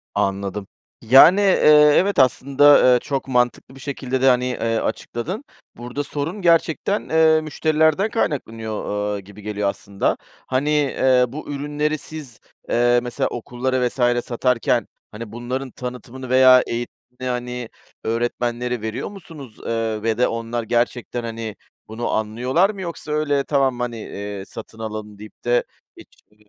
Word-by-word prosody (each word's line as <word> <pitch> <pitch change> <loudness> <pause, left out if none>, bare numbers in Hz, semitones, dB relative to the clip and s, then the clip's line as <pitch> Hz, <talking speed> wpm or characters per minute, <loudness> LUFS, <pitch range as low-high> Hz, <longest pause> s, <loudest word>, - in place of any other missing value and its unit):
Anladım. 100 0 -2 0.3
Yani, 135 - +7
eee, 150 -6 +6
evet 200 -2 +2
aslında, 135 +1 +5
eee, 125 - +4
çok 135 0 -3
mantıklı 125 +1 0
bir 135 - -13
şekilde 130 -2 -3
de, 135 - +4
hani, 125 0 +3
eee, 115 -2 -1
açıkladın. 145 - -4 0.3
Burada 125 +4 -4
sorun 150 +9 -4
gerçekten, 170 +3 +1
eee, 160 0 +4
müşterilerden 155 +5 +1
kaynaklanıyor, 115 - -3
ııı, 105 0 -2
gibi 100 +2 -13
geliyor 105 -1 -1
aslında. 100 0 -2 0.3
Hani, 135 +3 0
eee, 130 -3 +3
bu 145 +6 -8
ürünleri 150 +2 -2
siz, 150 -5 -9 0.3
eee, 120 +1 +3
mesela 120 -1 -1
okullara 125 +1 -1
vs. 120 -1 0
satarken, 120 -1 0 0.2
hani, 110 0 -8
bunların 125 +2 -4
tanıtımını 125 +1 -8
veya 130 0 +7
eğitimini, 120 +1 -4 0.3
hani, 125 -1 -4 0.3
öğretmenlere 120 +1 -2
veriyor 110 +4 -4
musunuz? 160 - -12
Eee, 115 -2 -2
ve 115 -1 0
de 125 - +3
onlar 115 0 -3
gerçekten, 120 +1 -1
hani, 115 -2 -5 0.3
bunu 110 +2 -4
anlıyorlar 125 - +1
mı? 200 -3 -6
Yoksa 170 -3 -6
öyle 145 -2 +1
tamam, 135 -4 +1
hani, 120 -1 -3
eee, 100 -2 -6
satın 115 0 -10
alalım 110 -2 -6
deyip 105 0 -13
de 120 0 +2 0.3
hiç - - -13 0.2
bir 105 0 -28
125 Hz, 145 wpm, -21 LUFS, 115-145 Hz, 0.3 s, Yani